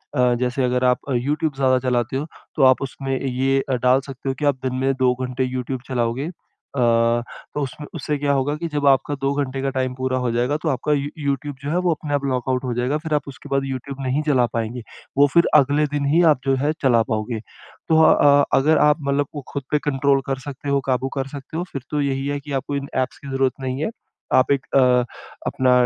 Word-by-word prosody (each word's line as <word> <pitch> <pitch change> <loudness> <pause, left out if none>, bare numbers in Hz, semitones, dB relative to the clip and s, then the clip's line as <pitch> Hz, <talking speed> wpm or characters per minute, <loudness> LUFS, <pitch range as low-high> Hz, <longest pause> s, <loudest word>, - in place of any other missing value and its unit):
अ, 125 -1 +3
जैसे 125 +1 0
अगर 125 0 +1
आप 125 0 +3
यूट्यूब 145 +5 0
ज़्यादा 130 -1 +3
चलाते 125 +1 0
हो, 145 - -2 0.3
तो - - +2
आप 130 0 +5
उसमें 135 0 -3
ये 135 +1 +1 0.2
डाल 130 +2 +4
सकते 135 0 -5
हो 135 - -1
कि 150 - -1
आप 140 -2 +3
दिन 130 -1 -1
में 135 +1 +1
2 125 -1 +4
घंटे 125 +1 -2
यूट्यूब 130 0 -3
चलाओगे। 125 +2 -1
अ, 150 -5 -8 0.7
तो 150 - -1
उसमें 145 +2 -5
उससे 150 -1 -2
क्या 140 0 0
होगा 140 +2 0
कि 170 +2 -4
जब 145 -1 0
आपका 140 +2 +3
2 135 +1 +1
घंटे 135 0 -5
का 135 - 0
टाइम 130 -1 0
पूरा 130 0 -1
हो 120 - +1
जाएगा, 125 +5 0
तो 155 0 -2
आपका 140 +2 -1
यू 140 0 0
यूट्यूब 140 -1 -2
जो 145 - -3
है, 170 - 0
वो 180 -1 +2
अपने 150 -1 -5
आप 140 -1 0
लॉकआउट 130 -1 -1
हो 125 -2 -2
जाएगा। 125 +5 0
फिर 155 0 -4
आप 150 - 0
उसके 140 +1 -10
बाद 135 0 +1
यूट्यूब 135 +1 -5
नहीं 135 +4 +1
चला 130 -5 +4
पाएँगे 115 +1 -3 0.4
वो 145 +1 +6
फिर 170 0 +5
अगले 145 +1 +4
दिन 140 -1 0
ही 170 - +5
आप - - -11
जो 135 0 +3
है, 145 +3 +1
चला 120 -4 +4
पाओगे। 110 +1 -2 0.5
तो 160 0 +5
अ, 145 -2 +6
अगर 150 +3 +4
आप, 150 +1 +4
मतलब, 140 0 +1
को 145 - -5
खुद 140 - -4
पे 150 - +3
कंट्रोल 135 0 +2
कर 135 -1 -2
सकते 140 +1 -6
हो, 140 - +3
काबू 130 +1 +1
कर 135 0 -1
सकते 140 +3 -8
हो, 175 - -1
फिर 135 - -4
तो 150 - 0
यही 135 -1 -1
है 145 0 -1
कि 145 +1 -10
आपको 145 - -4
इन 140 0 -3
ऐप्स 130 -1 -1
की - - -6
ज़रूरत 135 -1 +1
नहीं 130 +2 -3
है। - - 0 0.5
आप 130 - +4
एक 140 -2 +1
अ, - - +7 0.7
अपना 130 -1 +2
135 Hz, 235 wpm, -22 LUFS, 130-145 Hz, 0.7 s, अ